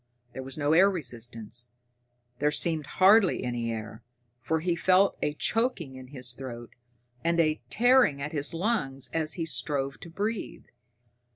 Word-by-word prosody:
There 130 - -6
was 135 +2 -5
no 150 0 +1
air 190 +4 +6
resistance 120 - -5 0.7
there 150 - +2
seemed 155 -1 +1
hardly 195 +1 +5
any 120 -2 -2
air, 110 -1 -6 0.4
for 160 +7 0
he 170 +1 0
felt 185 +3 +3
a 150 - -1
choking 225 - -1
in 130 0 -10
his 125 -2 -5
throat, 120 -2 -8 0.5
and 170 0 +1
a 155 -1 +2
tearing 245 - +4
at 150 +2 -4
his 145 -2 0
lungs 165 - -1
as 155 -1 0
he 165 - -2
strove 140 -1 -1
to 175 - -10
breathe. 205 +5 -4
150 Hz, 155 wpm, -28 LUFS, 130-175 Hz, 0.7 s, air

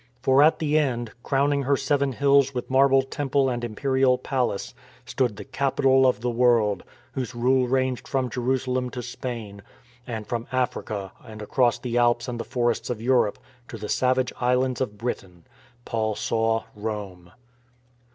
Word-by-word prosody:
For 130 +2 +4
at 155 +2 +5
the 155 -1 +2
end, 120 -6 -1
crowning 140 +2 +1
her 140 +1 +1
seven 140 -2 0
hills 140 0 +3
with 125 +1 -4
marble 135 0 +5
temple 135 0 0
and 120 -1 -3
Imperial 130 +3 +1
Palace, 125 -5 -2 0.3
stood 125 -5 -1
the 100 -1 -9
Capital 135 -1 +3
of 125 -4 +1
the 125 - -1
World, 115 -4 +3 0.3
whose 130 -2 -4
rule 125 +1 +2
ranged 130 0 0
from 130 -2 0
Jerusalem 125 +1 -1
to 125 -1 -6
Spain, 115 -5 -6 0.5
and 110 -3 -5
from 115 +1 -4
Africa 110 -6 -2
and 110 -1 -11
across 120 +3 +1
the 120 -1 -1
Alps 120 0 +2
and 120 -1 -4
the - - -2
forests 120 -1 -1
of 120 -3 -3
Europe 120 -3 +2 0.3
to 115 - -8
the 105 0 -7
savage 130 0 +1
islands 125 +1 +1
of 105 -5 -3
Britain. 95 -7 -5 0.4
Paul 110 -2 -1
saw 115 +1 0
Rome. 100 -5 -6
125 Hz, 160 wpm, -25 LUFS, 115-130 Hz, 0.5 s, at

